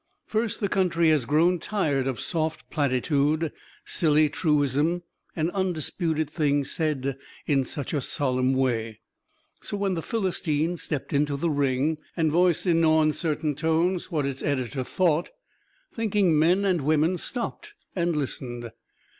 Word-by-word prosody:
First, 220 0 -2
the 200 - +2
country 170 -4 +2
has 150 -6 +3
grown 170 +6 +3
tired 150 -10 0
of 130 -3 -2
soft 160 -2 -2
platitude, 145 +2 +1 0.3
silly 155 -2 +3
truism 150 +2 +1 0.3
and 160 +1 0
undisputed 165 -4 -1
things 145 -2 0
said 140 -4 -1 0.3
in 140 -3 +2
such 140 +1 -5
a 145 - 0
solemn 130 -1 0
way. 115 -4 -1 0.6
So 205 - -4
when 200 -1 0
"The 165 - -2
Philistine" 170 -6 -1
stepped 150 -4 -4
into 145 0 +1
the 165 +3 0
ring 145 +2 +1 0.2
and 160 -2 +2
voiced 175 +2 +2
in 165 -2 +3
no 160 -1 +4
uncertain 155 0 0
tones 165 +5 0
what 155 -6 -1
its 135 -1 -3
editor 130 -1 -1
thought, 170 +3 +1 0.6
thinking 205 -8 +2
men 180 +6 +3
and 185 -5 +2
women 155 +5 +2
stopped 260 - -5 0.2
and 170 -2 0
listened. 120 -4 -4
155 Hz, 140 wpm, -26 LUFS, 140-175 Hz, 0.6 s, no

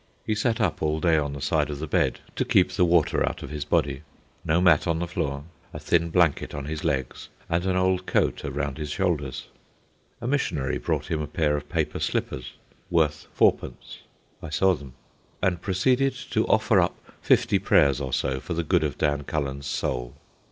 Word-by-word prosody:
He 110 - 0
sat 115 +2 0
up 95 -8 0
all 80 0 0
day 85 0 +3
on 70 -1 -2
the 70 - -7
side 75 +1 +1
of 75 - -4
the 75 - -4
bed 75 - 0
(to - - +1
keep 90 - +3
the 90 -1 +2
water 85 -3 +3
out - - -3
of - - -8
his 75 -1 -3
body), 70 -2 0 0.4
no 80 0 +2
mat 90 -4 +4
on 85 -1 +1
the 85 - -1
floor, 70 -5 -3 0.3
a - - -6
thin 85 0 +1
blanket 85 -3 +1
on 70 -1 -5
his 75 +1 -5
legs, 65 -4 -2 0.2
and 85 +2 0
an 95 - +1
old 95 0 +1
coat - - +1
around 70 +1 -3
his 75 -1 -4
shoulders. 75 -7 -1 0.7
A - - -7
missionary 90 - -1
brought - - -2
him 80 -1 0
a 75 - -3
pair 75 -2 +1
of 75 0 -5
paper 80 -3 -1
slippers, 65 0 -3 0.4
worth 80 -3 +1
fourpence - - 0 0.4
(I 80 - -7
saw 95 +5 +3
them), 70 -6 -8 0.5
and 90 -2 0
proceeded 130 +8 +1 0.2
to - - +1
offer - - +3
up - - -1 0.2
fifty - - +3
prayers 70 0 +3
or 65 -2 -3
so 65 +2 0
for 85 - -5
the 85 - -1
good 80 - +2
of 75 -4 -2
Dan 75 -1 0
Cullen's 70 -1 -3
soul. - - -3
75 Hz, 195 wpm, -25 LUFS, 70-90 Hz, 0.7 s, mat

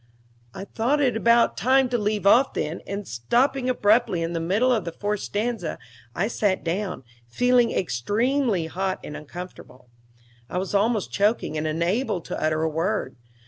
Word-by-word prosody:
I 195 - -6
thought 240 +8 0
it 255 -5 +2
about 235 +1 +3
time 265 +1 +3
to 245 - +1
leave 210 -1 -1
off 245 +7 +5
then, 155 +3 -3
and 200 0 -5
stopping 250 - +1
abruptly 215 -6 +2
in 165 +1 -3
the 165 - -1
middle 205 +10 +2
of 220 -5 0
the 170 - -5
fourth 205 +4 -2
stanza 210 -5 -3 0.4
I 195 - 0
sat 205 -4 0
down, 180 -2 -3 0.2
feeling 245 - +3
extremely 205 - 0
hot 190 +3 -2
and 150 - -7
uncomfortable. 150 -6 -10 0.6
I - - -3
was 190 +2 -3
almost 210 +1 +1
choking, 205 -5 +1
and 155 0 -1
unable 175 +8 0
to - - -6
utter 155 0 +1
a - - +2
word. 165 -2 -2
205 Hz, 165 wpm, -24 LUFS, 165-235 Hz, 0.6 s, off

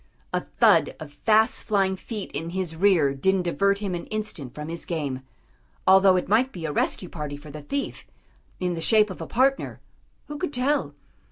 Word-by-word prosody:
A - - +1 0.2
thud - - +5
of 145 -2 -9
fast 220 - +2
flying 195 -3 +1
feet 210 +1 -6
in 165 +3 -4
his 175 -4 -2
rear 165 -6 +3
didn't 190 +7 +1
divert 200 +3 +1
him 200 -2 -3
an 175 - -5
instant 210 - -4
from 150 0 -6
his 165 +1 -5
game, 145 -6 -3 0.6
although 190 0 +6
it 180 - 0
might 235 +6 +3
be 170 -7 -6
a 155 - -2
rescue 180 +5 0
party 150 -4 -6
for 150 +1 -12
the 150 +1 -8
thief, 275 - -4 0.6
in 180 -1 -1
the 165 - -4
shape 215 +3 +4
of 185 - -8
a 165 - -5
partner, 270 +3 +1 0.5
who 295 0 -7
could 360 -5 -3
tell? 255 - 0
185 Hz, 190 wpm, -25 LUFS, 155-215 Hz, 0.6 s, although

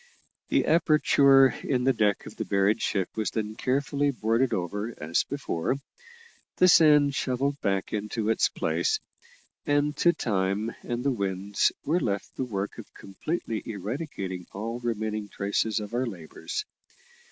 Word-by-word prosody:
The - - +2
aperture 140 -4 +5
in 125 -2 0
the 135 +1 +4
deck 105 -4 +1
of - - -10
the - - -3
buried 100 +3 +1
ship 95 -3 0
was 110 -1 -1
then 110 -1 -3
carefully 140 +4 0
boarded 120 0 +1
over 105 +6 -3
as 80 +2 0
before, 130 -7 -2 0.8
the 180 - +5
sand 150 -5 +6
shovelled 140 +2 -1
back 95 -1 -1
into 105 +1 -2
its - - +2
place, 435 -1 0 0.7
and 145 0 +2
to 175 - +5
time 105 - -1
and 120 0 -3
the 140 - +3
winds 100 -3 0
were 165 +4 +2
left 100 - -3
the - - -2
work 100 -4 -4
of - - -11
completely 110 - -4
eradicating 100 - -5
all 115 +4 -4
remaining 110 -3 -3
traces 105 +2 -1
of 105 +1 -7
our 125 +1 0
labours. 100 - -6
115 Hz, 145 wpm, -27 LUFS, 100-140 Hz, 0.8 s, sand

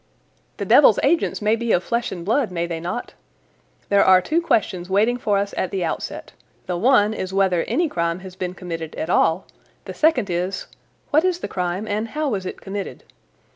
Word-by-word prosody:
"The - - -3
devil's - - +6
agents 335 -9 +1
may 215 +1 +3
be 235 0 -2
of 180 - +2
flesh 235 +4 -1
and 175 -2 -6
blood, 230 +3 +1
may 170 -1 -1
they 170 -1 -4
not? 180 +9 -5 0.8
There 200 0 +5
are 185 -1 +6
two 315 - 0
questions 185 - 0
waiting 215 +6 +2
for 210 -4 0
us 200 0 -2
at 185 - -1
the 190 -2 -2
outset. - - -5 0.3
The 180 - -2
one 215 +1 +3
is 185 -3 -5
whether 190 -3 +2
any 340 0 +1
crime 170 - -2
has 185 -1 -10
been 180 -1 -4
committed 165 -4 -6
at 160 - -3
all; 165 +1 +2 0.4
the - - -6
second 260 - +2
is, 180 +3 -2 0.5
what 305 +2 +4
is 370 -2 +1
the - - -3
crime 180 +3 -3
and 215 +2 -2
how 300 +4 -2
was 195 -6 -3
it - - -7
committed? 200 0 -6
195 Hz, 200 wpm, -22 LUFS, 180-235 Hz, 0.8 s, devil's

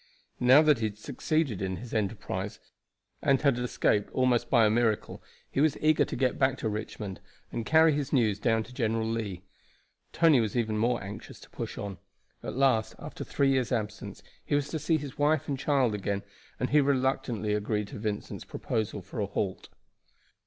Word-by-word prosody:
Now, 130 +5 +7
that 150 -5 +4
he 110 - 0
had 105 -1 -4
succeeded 135 - -1
in 95 -1 -2
his 115 +5 -9
enterprise, 105 -2 -3 0.6
and 135 -1 +3
had 140 -5 +2
escaped 110 -4 +1
almost 125 -2 +2
by 120 -4 +5
a - - +4
miracle, 110 -2 0 0.3
he 135 - +1
was 155 -2 +3
eager 155 0 +3
to - - -5
get 130 0 0
back 130 -1 +2
to 110 - -2
Richmond 105 -2 -5 0.3
and 115 - -4
carry 160 0 +6
his 145 -1 -2
news 110 -7 +2
down 115 0 +2
to 125 - -14
General 115 -3 0
Lee. 105 -5 -3 0.7
Tony 160 -6 +5
was 110 +2 -2
even 110 -2 0
more 120 +1 +1
anxious 105 +2 -9
to - - -15
push - - -6
on. 100 -3 -5 0.4
At - - -5
last, 130 -5 +2
after - - -7
three 140 -1 +1
years' 130 -2 +1
absence, 105 -3 -4 0.2
he 145 - 0
was 145 0 0
to 160 - -3
see 160 +2 +2
his 145 -3 -8
wife 150 0 +2
and 140 -2 -2
child 135 -6 +2
again, 100 -1 -2 0.4
and 125 - -1
he 150 0 +6
reluctantly 130 -6 0
agreed 105 0 -1
to - - -8
Vincent's 105 -1 -4
proposal 110 -3 -3
for 100 +6 -7
a 100 - 0
halt. 95 -1 -3
115 Hz, 190 wpm, -29 LUFS, 105-135 Hz, 0.7 s, Now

